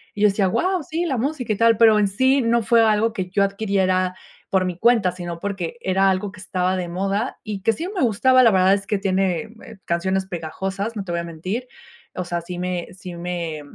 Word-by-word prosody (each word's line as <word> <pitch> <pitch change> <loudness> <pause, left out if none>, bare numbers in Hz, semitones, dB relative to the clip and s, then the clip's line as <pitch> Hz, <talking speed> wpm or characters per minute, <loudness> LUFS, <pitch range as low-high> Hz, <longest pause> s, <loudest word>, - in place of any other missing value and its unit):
y 205 - -5
yo 210 - +6
decía: 200 0 +1
"Guau, 370 - 0
sí, 330 +4 -3
la 275 -7 -1
música 255 -1 -2
y 210 - 0
tal", 230 +1 +5
pero 220 -2 +6
en 205 - +3
sí 260 +7 +2
no 235 0 +2
fue 230 +2 +4
algo 220 0 +3
que 185 -5 -4
yo 200 +2 +2
adquiriera 190 -2 0 0.3
por 190 -1 +2
mi 180 -2 -3
cuenta, 225 -3 +3
sino 175 -2 -6
porque, 195 -3 -4
era 195 0 +2
algo 190 +1 -1
que 200 - -14
estaba 185 0 -1
de 180 -1 -3
moda 195 +6 -2
y 205 -3 -5
que 225 - +3
sí 330 - -5
me 375 - -2
gustaba, 255 +3 +4
la 230 - +6
verdad 190 0 +4
es 195 -1 -2
que 205 - 0
tiene, 190 -3 0 0.2
eh, 225 -4 -12
canciones 190 +3 -1
pegajosas, 190 +5 -4
no 205 - -3
te 175 - -6
voy 170 - -1
a 170 - -3
mentir, 185 +9 -5 0.5
o 185 - -2
sea, 175 0 -3
sí 175 +1 -7
me 180 -1 -3
sí 180 -1 -9
me 170 -3 -4
195 Hz, 230 wpm, -22 LUFS, 180-225 Hz, 0.5 s, yo